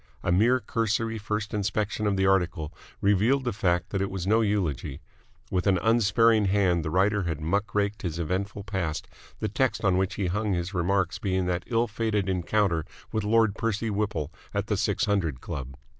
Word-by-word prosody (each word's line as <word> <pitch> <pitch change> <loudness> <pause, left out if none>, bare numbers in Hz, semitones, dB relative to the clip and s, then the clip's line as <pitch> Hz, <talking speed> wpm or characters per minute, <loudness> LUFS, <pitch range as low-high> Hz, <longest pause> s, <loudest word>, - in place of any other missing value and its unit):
A - - +1
mere 115 +8 +4
cursory 115 -1 -1
first 105 +1 -3
inspection 105 +1 -1
of 100 - +1
the 95 - +2
article 90 -5 +1 0.3
revealed 105 +7 +3
the 120 -3 -1
fact 90 -3 0
that 95 - -1
it 100 - 0
was 95 -2 -4
no 110 +3 +3
eulogy. 85 - -1 0.5
With 90 +1 0
an 95 -2 +4
unsparing 110 +1 +4
hand 95 -4 +2
the 80 - -2
writer 100 +3 +2
had 80 -3 -2
muck 100 +8 -1
raked 105 0 0
his 85 -3 -3
eventful 95 +5 -2
past, 95 -6 -3 0.3
the 110 - 0
text 115 +2 0
on 95 -1 +3
which 95 +1 0
he 100 - -1
hung 105 +3 0
his 90 +2 -2
remarks 90 0 0
being 95 -2 0
that 90 0 -1
ill 115 0 +2
fated 105 -3 -1
encounter 90 -2 +1 0.3
with 110 -2 -1
Lord 110 0 +3
Percy 110 0 -1
Whipple 100 -8 -2 0.2
at - - 0
the - - 0
Six - - +1
Hundred 85 -10 0
Club. 65 -1 -6
100 Hz, 190 wpm, -27 LUFS, 90-105 Hz, 0.5 s, mere